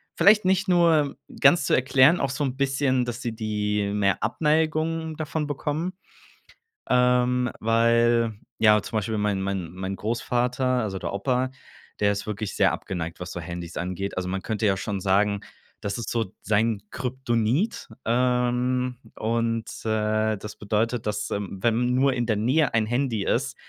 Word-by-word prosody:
vielleicht 210 Hz, 0 st, +5 dB
nicht 190 Hz, +2 st, +2 dB
nur 165 Hz, -5 st, +3 dB, 0.2 s
ganz 140 Hz, +1 st, +5 dB
zu -, -, +3 dB
erklären, 130 Hz, +5 st, +4 dB
auch 140 Hz, -, 0 dB
so 140 Hz, +3 st, -2 dB
'n 135 Hz, -2 st, -1 dB
bisschen, 135 Hz, -2 st, +1 dB
dass 120 Hz, 0 st, -5 dB
sie 115 Hz, -2 st, -3 dB
die 105 Hz, -2 st, -1 dB
mehr 100 Hz, -1 st, +1 dB
Abneigung 160 Hz, +5 st, 0 dB
davon 155 Hz, 0 st, -3 dB
bekommen, 150 Hz, +5 st, -3 dB, 1.0 s
ähm, 125 Hz, 0 st, +3 dB
weil 115 Hz, 0 st, +3 dB, 0.2 s
ja, 105 Hz, -1 st, +5 dB
zum 110 Hz, -, -4 dB
Beispiel 110 Hz, +1 st, -1 dB
mein 105 Hz, -2 st, 0 dB
mein 95 Hz, -3 st, -3 dB
mein 95 Hz, +2 st, -4 dB
Großvater, 120 Hz, +4 st, -1 dB, 0.2 s
also 95 Hz, -3 st, -3 dB
der -, -, -4 dB
Opa, 125 Hz, +5 st, 0 dB, 0.5 s
der 100 Hz, -, +4 dB
ist 100 Hz, +1 st, -4 dB
wirklich 105 Hz, -1 st, -4 dB
sehr -, -, +4 dB
abgeneigt, 85 Hz, -1 st, -5 dB
was 90 Hz, 0 st, -5 dB
so 90 Hz, -, -5 dB
Handys 85 Hz, 0 st, -7 dB
angeht. 95 Hz, +2 st, -4 dB
Also 90 Hz, -, -2 dB
man 95 Hz, +1 st, -2 dB
könnte 110 Hz, +1 st, -2 dB
ja 100 Hz, -2 st, +3 dB
schon 100 Hz, +1 st, -3 dB
sagen, 100 Hz, +2 st, +2 dB, 0.4 s
das 100 Hz, -1 st, -3 dB
ist 115 Hz, -, -4 dB
so 115 Hz, -5 st, -2 dB
sein 110 Hz, 0 st, +1 dB
Kryptonit, 130 Hz, -, -1 dB, 0.2 s
ähm, 125 Hz, +1 st, +1 dB, 0.2 s
und, 115 Hz, 0 st, -1 dB, 0.2 s
äh, 110 Hz, 0 st, +1 dB
das 105 Hz, +1 st, -8 dB
bedeutet, 110 Hz, +3 st, -1 dB
dass, 105 Hz, 0 st, -2 dB
ähm, 100 Hz, -1 st, -4 dB
wenn 120 Hz, +2 st, +2 dB
nur 130 Hz, +1 st, +3 dB
in 120 Hz, -1 st, -1 dB
der 110 Hz, -3 st, 0 dB
Nähe 130 Hz, +7 st, +2 dB
ein 110 Hz, -1 st, +2 dB
Handy 120 Hz, -3 st, 0 dB
ist, -, -, 0 dB
115 Hz, 160 wpm, -25 LUFS, 105-130 Hz, 1.0 s, vielleicht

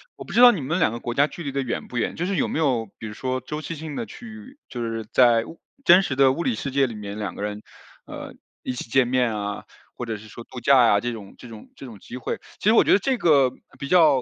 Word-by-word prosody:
我 -, -, -9 dB
不 -, -, -11 dB
知 -, -, +1 dB
道 245 Hz, 0 st, +10 dB
你 170 Hz, -, -4 dB
们 160 Hz, +7 st, -1 dB
两 -, -, +3 dB
个 120 Hz, -, -5 dB
国 120 Hz, -, -4 dB
家 140 Hz, +4 st, +3 dB
距 170 Hz, -, -9 dB
离 140 Hz, -, -4 dB
的 140 Hz, 0 st, -1 dB
远 125 Hz, -3 st, -4 dB
不 125 Hz, -, -6 dB
远， 115 Hz, -, -1 dB
就 175 Hz, -, -2 dB
是 195 Hz, +1 st, -1 dB
有 -, -, +1 dB
没 -, -, -3 dB
有 125 Hz, -8 st, +1 dB
比 110 Hz, -, -7 dB
如 105 Hz, -, -6 dB
说 130 Hz, +3 st, -3 dB
周 150 Hz, +5 st, -6 dB
期 165 Hz, -, -6 dB
性 155 Hz, -1 st, -7 dB
地 230 Hz, -, -3 dB
去 235 Hz, +4 st, -12 dB
就 120 Hz, -, -5 dB
是 115 Hz, -1 st, -3 dB
在 120 Hz, -3 st, +5 dB, 0.4 s
真 180 Hz, -5 st, +7 dB
实 140 Hz, -, -2 dB
的 135 Hz, -1 st, +5 dB
物 170 Hz, +6 st, -3 dB
理 245 Hz, -, 0 dB
世 140 Hz, -, -4 dB
界 135 Hz, 0 st, +2 dB
里 115 Hz, -, -7 dB
面 105 Hz, 0 st, -7 dB
两 105 Hz, -2 st, -4 dB
个 -, -, -7 dB
人， 105 Hz, 0 st, -4 dB, 0.4 s
呃， -, -, -8 dB, 0.3 s
一 -, -, -3 dB
起 120 Hz, -, -7 dB
见 130 Hz, +1 st, +4 dB
面 125 Hz, -3 st, +1 dB
啊， 105 Hz, -1 st, -4 dB, 0.3 s
或 120 Hz, -, -4 dB
者 115 Hz, -, -3 dB
是 105 Hz, +1 st, -11 dB
说 115 Hz, -, -10 dB
度 125 Hz, -2 st, -9 dB
假 140 Hz, -1 st, +5 dB
啊， 110 Hz, -4 st, +5 dB
这 120 Hz, 0 st, -2 dB
种 105 Hz, -4 st, -10 dB
这 120 Hz, -, -12 dB
种 110 Hz, -2 st, -12 dB
这 -, -, -10 dB
种 110 Hz, -6 st, -11 dB
机 -, -, -10 dB
会。 125 Hz, -, -4 dB, 0.2 s
其 210 Hz, -, +2 dB
实 -, -, +5 dB
我 -, -, +7 dB
觉 -, -, +3 dB
得 200 Hz, -, +5 dB
这 260 Hz, +5 st, 0 dB
个 140 Hz, -, +4 dB, 0.3 s
比 140 Hz, -, -6 dB
较 155 Hz, -7 st, +5 dB
130 Hz, 310 characters per minute, -23 LUFS, 115-155 Hz, 0.4 s, 道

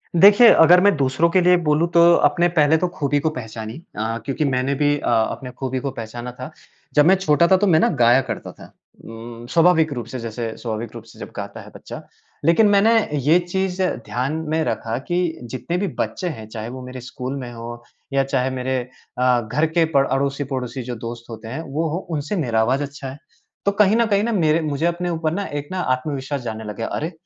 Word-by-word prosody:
देखिए 205 Hz, +7 st, +8 dB
अगर 175 Hz, +3 st, +7 dB
मैं 200 Hz, +1 st, +4 dB
दूसरों 135 Hz, +4 st, +2 dB
के 185 Hz, +2 st, +3 dB
लिए 180 Hz, 0 st, +5 dB
बोलूँ 150 Hz, +3 st, +3 dB
तो 170 Hz, 0 st, +5 dB
अपने 175 Hz, 0 st, +3 dB
पहले 150 Hz, +1 st, +5 dB
तो 180 Hz, +3 st, 0 dB
ख़ूबी 145 Hz, -4 st, -1 dB
को 160 Hz, +2 st, 0 dB
पहचानिए। 110 Hz, -5 st, -7 dB, 0.2 s
अ, 115 Hz, +1 st, -2 dB
क्योंकि 140 Hz, +2 st, -1 dB
मैंने 130 Hz, 0 st, 0 dB
भी 145 Hz, +1 st, +2 dB
अ, -, -, -2 dB
अपने 120 Hz, +2 st, 0 dB
ख़ूबी 130 Hz, -1 st, -2 dB
को 140 Hz, +1 st, -3 dB
पहचाना 120 Hz, 0 st, -7 dB
था। 130 Hz, +5 st, -7 dB, 0.4 s
जब 145 Hz, 0 st, +6 dB
मैं 185 Hz, +3 st, +6 dB
छोटा 170 Hz, -3 st, +3 dB
था 190 Hz, -, +5 dB
तो 205 Hz, -, +1 dB
मैं 160 Hz, -4 st, +5 dB
ना -, -, +3 dB
गाया 120 Hz, +3 st, +6 dB
करता -, -, -5 dB
था। -, -, -15 dB, 0.3 s
उम, 115 Hz, +1 st, -9 dB
स्वाभाविक 165 Hz, -2 st, +4 dB
रूप 120 Hz, -4 st, -5 dB
से 130 Hz, +1 st, -6 dB
जैसे 115 Hz, 0 st, -5 dB
स्वाभाविक 115 Hz, -1 st, -5 dB
रूप 115 Hz, -, -8 dB
से 115 Hz, -, -17 dB
जब -, -, -8 dB
गाता -, -, -7 dB
है -, -, -13 dB
बच्चा। -, -, -9 dB, 0.4 s
लेकिन 170 Hz, +7 st, +5 dB
मैंने 205 Hz, +3 st, +4 dB, 0.2 s
ये 150 Hz, +4 st, +3 dB
चीज़ 185 Hz, +1 st, -2 dB, 0.2 s
ध्यान 130 Hz, +4 st, -2 dB, 0.2 s
में 160 Hz, 0 st, +1 dB
रखा 115 Hz, -6 st, -2 dB
कि 175 Hz, -, 0 dB, 0.3 s
जितने 130 Hz, +8 st, -4 dB
भी 195 Hz, +2 st, -1 dB
बच्चे 185 Hz, -, -2 dB
हैं, 110 Hz, -9 st, -8 dB
चाहे 110 Hz, 0 st, -6 dB
वो 130 Hz, +1 st, -8 dB
मेरे 130 Hz, 0 st, -8 dB
स्कूल 130 Hz, +2 st, -6 dB
में 125 Hz, -2 st, -7 dB
हो 120 Hz, 0 st, -8 dB, 0.3 s
या 135 Hz, 0 st, +3 dB
चाहे 130 Hz, -1 st, 0 dB
मेरे 130 Hz, 0 st, -2 dB, 0.4 s
अ, 125 Hz, -1 st, +3 dB
घर 130 Hz, +8 st, 0 dB
के 165 Hz, -, +5 dB
प 135 Hz, 0 st, +5 dB
अड़ोसी-पड़ोसी 135 Hz, -2 st, -2 dB
जो 120 Hz, 0 st, -5 dB
दोस्त 115 Hz, 0 st, -8 dB
होते 110 Hz, -1 st, -9 dB
हैं, 130 Hz, +8 st, -5 dB
वो 160 Hz, +2 st, -2 dB
हो 160 Hz, -, -2 dB, 0.2 s
उनसे 150 Hz, +8 st, -3 dB
मेरा 115 Hz, -2 st, +1 dB
आवाज़ 130 Hz, +5 st, +1 dB
अच्छा 140 Hz, -1 st, -7 dB
है। 135 Hz, -, -9 dB, 0.5 s
तो 200 Hz, -, +3 dB
कहीं 210 Hz, +1 st, +4 dB
न 235 Hz, 0 st, +3 dB
कहीं 205 Hz, -1 st, +2 dB
ना 235 Hz, -, 0 dB
मेरे 165 Hz, -6 st, +2 dB
मुझे 150 Hz, +1 st, -2 dB
अपने 175 Hz, +1 st, -1 dB
ऊपर 160 Hz, -2 st, -1 dB
ना 200 Hz, +3 st, -2 dB
एक 145 Hz, -, -8 dB
ना 185 Hz, -, -3 dB, 0.2 s
आत्मविश्वास 140 Hz, +1 st, -4 dB
जानने 110 Hz, -2 st, -5 dB
लग 105 Hz, -1 st, -6 dB
गया। 115 Hz, -, -3 dB
अरे! 160 Hz, +4 st, -3 dB
140 Hz, 220 wpm, -21 LUFS, 120-170 Hz, 0.5 s, देखिए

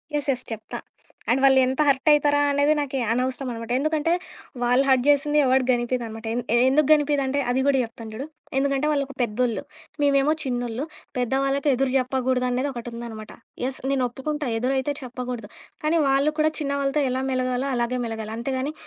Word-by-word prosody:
Yes. 290 Hz, -1 st, -1 dB
Yes. 255 Hz, -1 st, -3 dB
చెప్తా. 220 Hz, -1 st, -7 dB, 0.5 s
And 260 Hz, +2 st, +2 dB
వాళ్ళెంత 265 Hz, 0 st, +4 dB
hurt 275 Hz, +2 st, +3 dB
అవుతారా 290 Hz, -1 st, +4 dB
అనేది 285 Hz, +2 st, +3 dB
నాకీ 275 Hz, -2 st, -2 dB
అనవసరం 255 Hz, +2 st, -1 dB
అనమాట. 230 Hz, 0 st, -6 dB
ఎందుకంటే 310 Hz, +3 st, +1 dB, 0.5 s
వాళ్ళు 245 Hz, +2 st, +3 dB
హర్ట్ 260 Hz, -2 st, +4 dB
చేసింది 290 Hz, +1 st, +3 dB
ఎవడికి 260 Hz, 0 st, +2 dB
గనిపియదనమాట. 240 Hz, -2 st, -3 dB
ఎన్ 245 Hz, -, 0 dB
ఎ -, -, +5 dB
ఎందుకు 285 Hz, +1 st, +3 dB
గనిపియదంటే 285 Hz, -2 st, +1 dB
అది 250 Hz, +2 st, +1 dB
కూడా 280 Hz, -1 st, +4 dB
చెప్తాను 230 Hz, -1 st, -8 dB
చూడు, 255 Hz, +6 st, -5 dB, 0.3 s
ఎందుకంటే 275 Hz, +1 st, +1 dB
వాళ్ళకి 280 Hz, -2 st, -2 dB
పెద్దోళ్ళు, 235 Hz, 0 st, 0 dB, 0.4 s
మేమేమో 280 Hz, +1 st, +3 dB
చిన్నోళ్ళు. 245 Hz, 0 st, -2 dB, 0.3 s
పెద్దవాళ్లకు 270 Hz, +3 st, +1 dB
ఎదురు 265 Hz, +1 st, 0 dB
చెప్పకూడదు 255 Hz, 0 st, 0 dB
అనేది 255 Hz, +3 st, 0 dB
ఒకటుందనమాట. 235 Hz, -2 st, -7 dB, 0.3 s
యెస్. 265 Hz, 0 st, -3 dB
నేను 265 Hz, -2 st, +1 dB
ఒప్పుకుంటా 295 Hz, +3 st, -4 dB
ఎదురైతే 265 Hz, +4 st, 0 dB
చెప్పకూడదు. 250 Hz, -3 st, -6 dB, 0.3 s
కానీ 320 Hz, +2 st, +2 dB
వాళ్ళు 275 Hz, +3 st, +3 dB
కూడా 310 Hz, 0 st, +3 dB
చిన్నవాళ్ళతో 280 Hz, 0 st, 0 dB
ఎలా 260 Hz, +1 st, -1 dB
మెలగాలో 255 Hz, +1 st, -1 dB
అలాగే 240 Hz, +1 st, -1 dB
మెలగాలి. 220 Hz, -1 st, -5 dB
అంతేగాని 265 Hz, +4 st, -2 dB
265 Hz, 155 wpm, -24 LUFS, 245-280 Hz, 0.5 s, ఎ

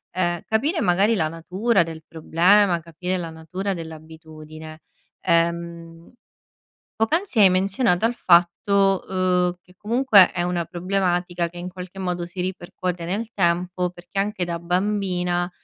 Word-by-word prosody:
ehm, 175 Hz, -2 st, 0 dB
capire 290 Hz, +10 st, 0 dB
magari 200 Hz, +3 st, +3 dB
la 160 Hz, -5 st, +1 dB
natura 180 Hz, +6 st, 0 dB
del 160 Hz, -1 st, -9 dB
problema, 175 Hz, +3 st, +3 dB
capire 180 Hz, +3 st, -4 dB
la 170 Hz, -2 st, -5 dB
natura 180 Hz, +5 st, -4 dB
dell'abitudine. 160 Hz, -1 st, -10 dB, 0.4 s
Ehm, 170 Hz, 0 st, -1 dB, 0.8 s
poc'anzi 290 Hz, -, 0 dB
hai 195 Hz, -2 st, +8 dB
menzionato 190 Hz, +2 st, +1 dB
al 240 Hz, +1 st, 0 dB
fatto, 190 Hz, +2 st, +3 dB
uhm, 180 Hz, -1 st, +1 dB
che 180 Hz, -, -23 dB
comunque 220 Hz, -3 st, +5 dB
è 175 Hz, -, -2 dB
una 175 Hz, -1 st, -1 dB
problematica 175 Hz, -1 st, -1 dB
che 175 Hz, -, -13 dB
in 175 Hz, +1 st, -6 dB
qualche 185 Hz, +1 st, -9 dB
modo 180 Hz, -2 st, -2 dB
si 175 Hz, +2 st, -11 dB
ripercuote 180 Hz, -1 st, -4 dB
nel 215 Hz, +6 st, -3 dB
tempo 180 Hz, 0 st, 0 dB
perché 175 Hz, +2 st, -7 dB
anche 200 Hz, -2 st, -1 dB
da 170 Hz, -1 st, -4 dB
bambina 180 Hz, -1 st, -1 dB
180 Hz, 135 wpm, -23 LUFS, 170-195 Hz, 0.8 s, hai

